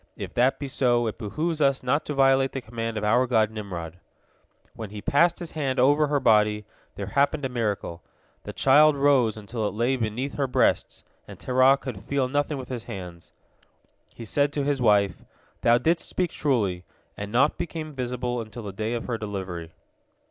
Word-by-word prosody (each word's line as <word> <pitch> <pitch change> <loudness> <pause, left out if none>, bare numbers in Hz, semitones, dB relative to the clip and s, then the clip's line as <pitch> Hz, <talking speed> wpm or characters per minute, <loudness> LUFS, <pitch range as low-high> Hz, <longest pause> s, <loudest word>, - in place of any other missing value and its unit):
If - - -6
that 125 +2 +2
be 140 - -5
so, 120 -3 +1
it 110 - -4
behooves 155 +9 -2
us 135 -2 +2
not 125 +5 0
to 150 - -4
violate 135 0 +3
the 135 - -4
command 115 -1 -5
of 105 - -3
our 125 +5 +3
god 110 -3 +2
Nimrod." 90 -6 -7 0.7
When 110 -3 -7
he 105 +1 -8
passed 165 +10 +2
his 175 - -7
hand 135 -5 -2
over 145 +4 +4
her 145 0 +1
body, 105 -3 +3 0.3
there 100 - -5
happened 140 - +1
a - - -1
miracle. 105 -8 -3 0.4
The - - -7
child 145 +2 +5
rose 135 -6 +3
until 110 +1 -3
it 100 - -5
lay 120 +4 +1
beneath 120 +4 -3
her 140 -2 0
breasts, 125 - +1 0.2
and - - -11
Terah 130 +2 +4
could 125 -8 -7
feel 135 +2 0
nothing 145 +2 -1
with 130 -2 -8
his 120 -3 -5
hands. 90 -7 -9 0.8
He 115 - -8
said 140 +6 +1
to 145 - -1
his 140 -2 -1
wife, 100 -7 +2 0.4
"Thou 120 0 +5
didst 165 +7 0
speak 180 -2 -1
truly," 105 -11 0 0.3
and 100 0 -6
naught 135 +6 +2
became 155 -3 -5
visible 125 -2 -3
until 115 +1 -9
the 100 -2 -6
day 110 +4 -2
of 115 - -4
her 120 -3 -3
delivery. 95 -6 -5
125 Hz, 190 wpm, -25 LUFS, 105-140 Hz, 0.8 s, child